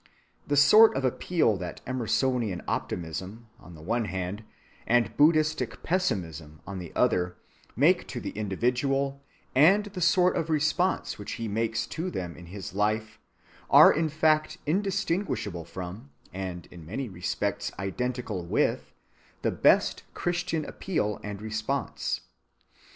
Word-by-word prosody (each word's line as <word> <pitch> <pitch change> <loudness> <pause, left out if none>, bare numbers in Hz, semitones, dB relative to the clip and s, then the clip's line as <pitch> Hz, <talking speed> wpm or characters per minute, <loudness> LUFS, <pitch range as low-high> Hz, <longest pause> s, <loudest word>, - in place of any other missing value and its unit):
The 145 - +1
sort 215 +9 +7
of 135 - 0
appeal 130 - +1
that 90 -2 -6
Emersonian 125 -5 0
optimism, 90 +7 -4
on 90 - -13
the 75 - -12
one 115 +6 0
hand, 95 +2 -4 0.4
and 120 0 +2
Buddhistic 155 -5 +2
pessimism, 85 - -2
on 100 -1 -6
the 85 -2 -8
other, 90 0 +2 0.4
make 170 - +3
to 125 - -5
the - - -5
individual 125 +7 -1 0.3
and 185 +10 +5
the 200 -3 -7
sort 180 +2 +4
of 165 - -1
response 160 - 0
which 105 - -5
he 115 -1 -4
makes 110 +1 -1
to 170 +3 -4
them 90 - -5
in 90 - -12
his 95 +1 -7
life 110 +2 -1 0.5
are - - +9
in 160 +1 0
fact 155 0 +2
indistinguishable 185 - -1
from, 95 +10 -8 0.2
and 90 -2 -5
in 85 -2 -11
many 110 - -4
respects 100 +2 -2
identical 115 -1 -3
with, 85 - 0 0.5
the - - +2
best - - +3
Christian 170 -3 -1
appeal 105 - -2
and 105 0 -6
response. 110 +5 -2
115 Hz, 135 wpm, -27 LUFS, 95-155 Hz, 0.5 s, are